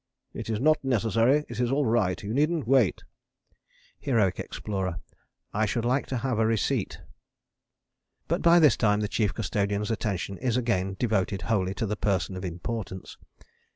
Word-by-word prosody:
It - - -6
is 110 -2 -1
not 155 +3 +3
necessary: 120 +3 +2
it - - -7
is 120 0 +1
all 140 +1 +2
right. 105 -6 +1
You 105 +2 -4
needn't 150 0 +1
wait. 130 -6 +3 1.0
HEROIC 110 -9 +1
EXPLORER. 95 -4 -4 0.5
I 110 +1 +1
should 115 +2 -1
like 130 +3 +1
to 130 - -2
have 125 -2 -1
a 110 - +3
receipt. 110 -3 -1 1.3
But - - 0
by 170 0 +6
this 150 -7 +6
time 105 -1 +2
the 105 - 0
Chief 105 -1 0
Custodian's 105 +1 -1
attention 100 -3 -3
is 125 -2 0
again 95 -6 0
devoted 100 -5 0
wholly 95 -4 0
to 115 - -2
the 105 0 -2
Person 95 -2 -1
of 95 - -6
Importance. 95 +2 -5
110 Hz, 160 wpm, -27 LUFS, 100-125 Hz, 1.3 s, by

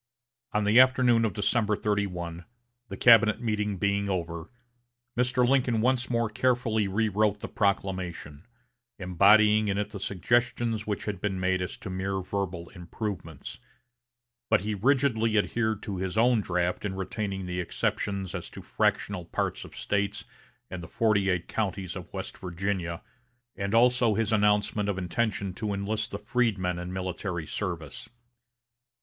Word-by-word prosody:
On 105 - +1
the 105 +4 +5
afternoon 130 -3 +5
of 110 - -1
December 105 0 +1
31, 90 -5 -2 0.4
the 95 - -6
cabinet 110 -2 +6
meeting 105 -3 -1
being 100 +1 0
over, 85 -2 -3 0.7
Mr. 125 0 +2
Lincoln 125 -3 +2
once 125 +2 +1
more 115 -2 +1
carefully 110 -2 +1
rewrote 105 0 +1
the - - -4
proclamation, 95 -6 -2 0.5
embodying 105 +3 +5
in 100 -1 0
it 105 - -2
the 100 - -6
suggestions 115 +3 0
which 105 -2 -2
had 100 -3 -4
been 95 -2 -1
made 95 0 +1
as 90 - -4
to 100 - -7
mere 95 +1 -2
verbal 90 -3 -4
improvements; 90 -3 -6 0.9
but - - +4
he 105 +2 -2
rigidly 115 -1 +2
adhered 110 0 0
to 100 -4 -4
his 95 +2 -3
own 120 0 +4
draft 90 -2 -1
in 100 -2 -3
retaining 95 0 -3
the 90 0 -3
exceptions 95 +2 -2
as - - -5
to - - -10
fractional 95 -4 0
parts - - -2
of - - -12
States 100 0 -1 0.5
and 90 -2 -5
the 80 - -8
forty 100 -1 +2
eight 90 -2 0
counties 95 -4 -3
of 90 -3 -8
West - - -6
Virginia; 90 -1 -3 0.5
and 100 +2 -2
also 120 -2 +4
his 115 +1 0
announcement 105 0 +2
of 100 - -1
intention 100 +1 -1
to 105 +1 -3
enlist 105 +2 -2
the 100 - -4
freedmen 105 -6 0
in 90 +1 -5
military 90 -2 -3
service. 85 -3 -5
100 Hz, 150 wpm, -28 LUFS, 95-110 Hz, 0.9 s, cabinet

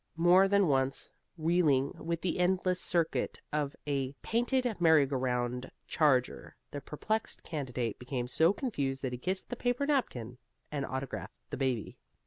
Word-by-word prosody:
More 180 +3 +6
than 200 -1 +4
once, 135 -1 0 0.3
reeling 155 -5 +2
with 170 0 -3
the 180 -1 -1
endless 180 0 +2
circuit 170 -2 0
of 150 -1 -1
a 140 -2 -1
painted 245 +3 +1 0.2
merry 160 -4 +6
go 135 0 -3
round 125 0 -1 0.2
charger, 135 -5 +1 0.2
the 145 - -5
perplexed 215 +11 -3
candidate 125 -7 -3
became 125 -1 -3
so 160 +7 +4
confused 140 - -2
that 130 - -1
he 125 - -4
kissed 185 +6 -3
the - - -1
paper 245 +3 0
napkin 125 - -1 0.3
and 140 -2 -2
autographed 130 0 -5
the - - -3
baby. 130 -4 -2
150 Hz, 150 wpm, -31 LUFS, 130-180 Hz, 0.3 s, More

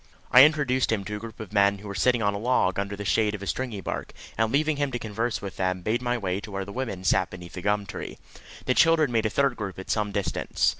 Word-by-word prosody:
I 130 +2 +10
introduced 145 -5 +1
him 100 -3 -1
to 105 +2 -4
a - - -5
group 115 +1 -9
of 105 -2 -8
men 100 -1 +4
who 105 +1 -11
were 100 - -5
sitting 120 +2 +2
on 100 0 +2
a 100 - -3
log, 105 -6 +1
under 100 0 -3
the 105 0 -6
shade 105 +2 +2
of 100 - -8
a - - -5
stringybark, 110 0 -4 0.2
and 115 0 +1
leaving 150 +1 +1
him 145 -1 0
to - - 0
converse 115 0 -3
with 100 - -6
them, 95 -1 -1
made 115 +3 +1
my 120 0 0
way 95 -4 -2
to 105 - -9
where 95 -1 -4
the 100 - -9
women 115 -8 -4
sat 95 -1 +2
beneath 90 -1 -10
a 90 - -5
gum 105 +1 0
tree. - - -7 0.5
The 130 - +2
children 160 -2 +4
made 115 -2 +2
a - - -2
third 135 +2 +1
group 100 -5 -5
at 95 - -5
some 105 -2 0
distance. 100 -1 -1
105 Hz, 265 wpm, -26 LUFS, 100-125 Hz, 0.5 s, I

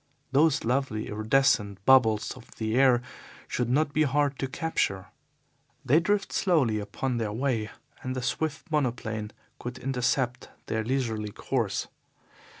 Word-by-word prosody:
Those 150 +1 +3
lovely 120 -3 -1
iridescent 105 -3 +1
bubbles 110 -5 +5
of 125 -2 -15
the 110 -1 -2
air 125 -2 +5 0.4
should 125 -2 -1
not 145 +3 +2
be 155 - +2
hard 145 -1 +1
to 135 - -1
capture. 130 - -2 0.8
They 140 +5 +5
drift 200 +4 0
slowly 140 - +2
upon 120 +5 -3
their 110 -3 -1
way, 115 -2 -1 0.3
and 130 0 -4
the 130 - -3
swift 155 +6 -2
monoplane 115 -7 -1 0.3
could 120 +1 -6
intercept 130 -1 -1 0.2
their 110 0 -1
leisurely 115 -4 -1
course. - - -2
125 Hz, 135 wpm, -27 LUFS, 110-140 Hz, 0.8 s, bubbles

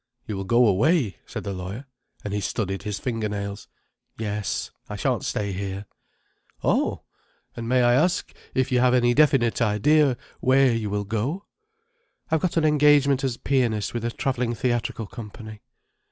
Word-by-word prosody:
"You 105 - -4
will 95 0 -4
go 120 +4 +4
away?" 115 - +2
said - - -6
the 100 - -4
lawyer, 95 +8 -6 0.4
and 105 - -4
he 105 - -1
studied 95 -1 -2
his 105 -1 -4
finger 115 0 -2
nails. 100 0 -5 0.5
"Yes. 105 -2 -3 0.2
I - - -4
shan't - - -1
stay 100 -1 -2
here." 100 +1 -4 0.8
"Oh! - - +1 0.5
And 115 -1 -5
may 125 0 +4
I 120 0 +5
ask 170 +8 +1 0.2
if 130 -1 +1
you 125 - +3
have 125 0 +4
any 120 -1 +3
definite 135 -5 +3
idea, 125 +5 +3 0.2
where 130 -1 +4
you 110 -2 -2
will 100 0 -2
go?" 120 - -2 0.9
"I've 160 -1 +2
got 180 -2 -1
an 160 - +3
engagement 145 -2 +4
as 130 -3 -1
pianist, 120 -6 0
with 120 -1 -3
a 120 - 0
travelling 125 -1 -1
theatrical 115 -2 -1
company." 110 -1 -10
120 Hz, 165 wpm, -24 LUFS, 105-130 Hz, 0.9 s, I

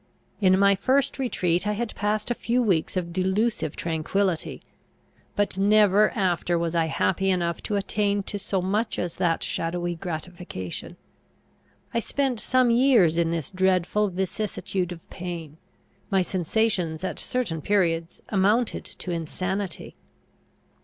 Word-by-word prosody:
In 190 -2 +5
my 200 0 +5
first 265 +8 +1
retreat 185 -7 0
I 210 - +1
had 230 +1 -3
passed 210 +3 -1
a - - +4
few 240 +1 0
weeks 185 -4 +1
of 170 -2 -3
delusive 190 -3 0
tranquillity, 170 +2 -1 0.7
but 205 -1 0
never 210 0 +5
after 175 -2 +1
was 170 0 -1
I 165 -1 +2
happy 190 +4 +1
enough 170 -3 0
to 210 - -2
attain 200 0 0
to 205 +1 -5
so 195 -2 -2
much 210 +5 0
as 175 -1 -3
that 170 -3 +1
shadowy 175 +1 -2
gratification. 170 - -6 1.0
I 230 - +2
spent 260 0 -1
some 255 +1 +3
years 230 -10 +4
in 165 -1 +2
this 165 -1 -3
dreadful 190 +2 +2
vicissitude 190 -1 -2
of 170 -2 -9
pain. 170 -4 -6 0.5
My 195 -3 +3
sensations 180 -2 0
at 185 - -3
certain 205 -11 -2
periods 170 -3 0
amounted 210 +4 +2
to 180 - -7
insanity. 180 +2 -3
190 Hz, 135 wpm, -25 LUFS, 170-210 Hz, 1.0 s, In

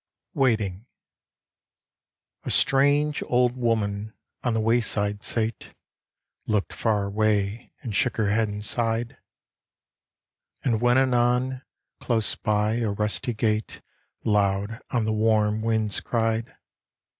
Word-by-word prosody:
WAITING 110 -5 0 1.6
A - - -5
STRANGE 145 +2 +3
old 125 0 +2
woman 110 -3 -1 0.3
on 120 -2 0
the - - +1
wayside 110 -2 0
sate, 115 -1 -2 0.7
Looked 105 -2 0
far 105 -3 0
away 105 +1 0
and 115 - -4
shook 125 +4 +1
her 105 -2 +1
head 110 +1 +2
and 105 0 -5
sighed. 115 +1 0 1.5
And 115 -4 +1
when 120 +1 +4
anon, 125 0 +2 0.4
close 110 -5 0
by, 105 +1 0
a 115 -3 0
rusty 105 +3 -2
gate 110 0 -1 0.4
Loud 100 +1 +1
on 120 -3 0
the 110 - 0
warm 110 -1 +2
winds 110 -2 0
cried. 115 +2 -1
110 Hz, 110 wpm, -25 LUFS, 105-120 Hz, 1.6 s, when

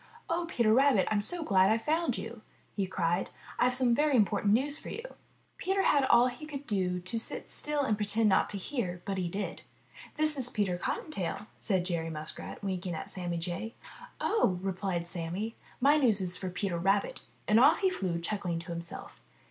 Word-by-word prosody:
*'0h, 340 0 0
Peter 235 -8 +2
Rabbit, 265 -6 +4
I'm 210 -1 +2
so 345 +10 +1
glad 190 -7 +4
I've 225 +1 +1
found 310 -5 +1
you!" 225 0 -7 0.3
he 195 -2 0
cried. 175 0 0 0.3
"I've 250 0 +3
some 250 -2 +4
very 295 +2 +3
important 205 -2 +3
news 280 +7 +2
for - - -8
you!" 460 - -5 0.6
Peter 385 +1 +1
had 285 -2 +4
all 240 -1 +6
he 280 +5 -4
could 285 -2 -6
do 185 -5 0
to 185 +6 -3
sit - - -4
still 295 -1 -1
and 220 -5 +1
pretend 210 +2 +1
not 190 -2 +3
to 205 - -3
hear, 185 -5 -3
but 195 -1 -2
he 180 - -1
did. 200 +4 -4 0.5
"This 305 -2 +2
is 250 -1 +1
Peter 195 -6 -1
Cottontail," 210 - -3
said 190 -5 0
Jerry 170 -3 -1
Muskrat, 155 +5 -5
winking 185 -3 -2
at - - -6
Sammy 175 -2 -3
Jay. 175 +7 -3 0.4
"Oh," 200 - +2
replied 185 -2 -2
Sammy, 180 +6 -3 0.2
"my 285 +4 +5
news 235 -8 +3
is 180 -1 0
for 185 0 -3
Peter 180 -1 -2
Rabbit!" 195 +3 +1 0.3
and 215 +2 +5
off 300 +6 +6
he 380 -1 +3
flew, 180 - -2
chuckling 180 -1 -2
to 170 +1 -7
himself. 170 0 -7
205 Hz, 190 wpm, -30 LUFS, 180-260 Hz, 0.6 s, all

